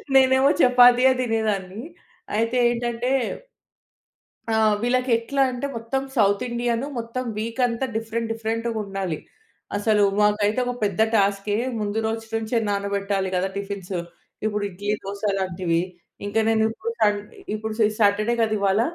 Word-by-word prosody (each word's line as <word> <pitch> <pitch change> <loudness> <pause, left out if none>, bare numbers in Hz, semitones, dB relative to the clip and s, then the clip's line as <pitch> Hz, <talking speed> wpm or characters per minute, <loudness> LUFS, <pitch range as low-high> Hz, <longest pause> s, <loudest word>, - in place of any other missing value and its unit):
నేనేమో 265 +1 +5
చపాతీయే 250 +1 +6
తినేదాన్ని. 215 -4 -1 0.6
అయితే 230 +3 +1
ఏంటంటే 240 +1 -2 1.4
ఆ! 220 - +2 0.3
వీళ్ళకి 250 +1 +1
ఎట్లా 270 +4 0
అంటే 250 +2 -3
మొత్తం 230 +4 -2
సౌత్ 200 0 +3
ఇండియాను 240 +2 -1
మొత్తం 235 +2 -4
వీక్ 230 +3 -4
అంతా 240 +2 -2
డిఫరెంట్ 225 0 -3
డిఫరెంట్‌గుండాలి. 220 -6 -3 0.6
అసలు 205 0 +3 0.2
మాకైతే 210 +2 +2
ఒక 245 - -2
పెద్ద 200 0 -1
టస్కె 200 0 +2 0.2
ముందు 210 +1 -2
రోజు 225 0 -3
నుంచే 225 +1 -1
నానబెట్టాలి 200 -1 -1
కదా 190 +2 0
టిఫిన్స్. 200 -2 -4 0.5
ఇప్పుడు 210 -1 -1
ఇడ్లీ 205 +3 -3
దోస 200 +1 -6 0.2
లాంటివి. 175 -3 0 0.5
ఇంక 205 +2 -6
నేను 220 -1 +3
ఇప్పుడు 455 - -5
సం 205 0 +4 0.4
ఇప్పుడు 215 0 -4
సి 215 - +6
సాటర్డే 210 +3 +3
కదా 215 -1 +1
ఇవాళ. 200 +1 +2
220 Hz, 130 wpm, -23 LUFS, 200-235 Hz, 1.4 s, చపాతీయే